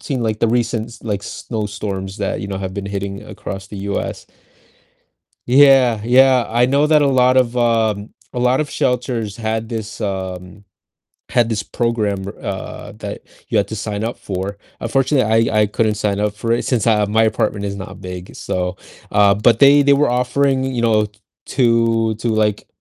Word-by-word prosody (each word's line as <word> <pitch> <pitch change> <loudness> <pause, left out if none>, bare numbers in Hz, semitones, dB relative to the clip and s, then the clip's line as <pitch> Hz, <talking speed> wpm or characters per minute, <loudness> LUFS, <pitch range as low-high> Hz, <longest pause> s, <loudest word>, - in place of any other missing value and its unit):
seen, 135 -5 -3
like, 110 -2 -1
the 115 - +3
recent 115 -1 0
s 115 0 -14
like, 105 -3 -3
snowstorms 100 -3 -5
that, 100 - -2
you - - -5
know, 100 - -4
have 95 -1 -4
been 100 -1 -4
hitting 100 0 -4
across 95 -1 -7
the 100 - -9 0.2
US. - - -4 1.2
Yeah, 130 -3 +5
yeah, 125 0 +5
I 120 +2 +3
know 140 +3 +3
that 150 -1 +4
a - - +3
lot 130 -1 +3
of, 125 -1 +2
um, 110 -3 +1 0.2
a - - -4
lot 125 +2 +2
of 150 - -3
shelters 120 -4 -1
had 110 -1 -3
this, 110 -2 -6
um 95 -1 -5 0.7
had 120 -2 +2
this 105 -3 -1
program 110 -4 -1
where, 100 +2 -8
uh, 95 -1 -6
that - - -7 0.3
you - - +1
had 100 - +2
to 110 - -4
sign 105 -1 -4
up 115 +2 -2
for, 95 +1 -4 0.2
unfortunately, 115 -2 +2
I 110 -1 +2
I - - +4
couldn't 105 +1 0
sign 100 -1 -1
up 105 0 -1
for 115 +2 -2
it 115 - +1
since 125 -5 0
I 110 -2 +3
my 110 +2 +2
apartment 110 -2 0
is 100 0 -3
not 95 0 -8
big, 90 -1 -8
so, 90 0 -3 0.3
uh 100 -1 +5
but 110 +3 +3
they 140 +1 +7
they 140 0 +5
were 145 +1 +3
offering, 130 +2 +1
you 130 -3 -2
know, 110 -2 +3 0.4
to 115 -3 +2
to, 110 +3 -4
like, 110 -2 0
110 Hz, 185 wpm, -19 LUFS, 100-125 Hz, 1.2 s, they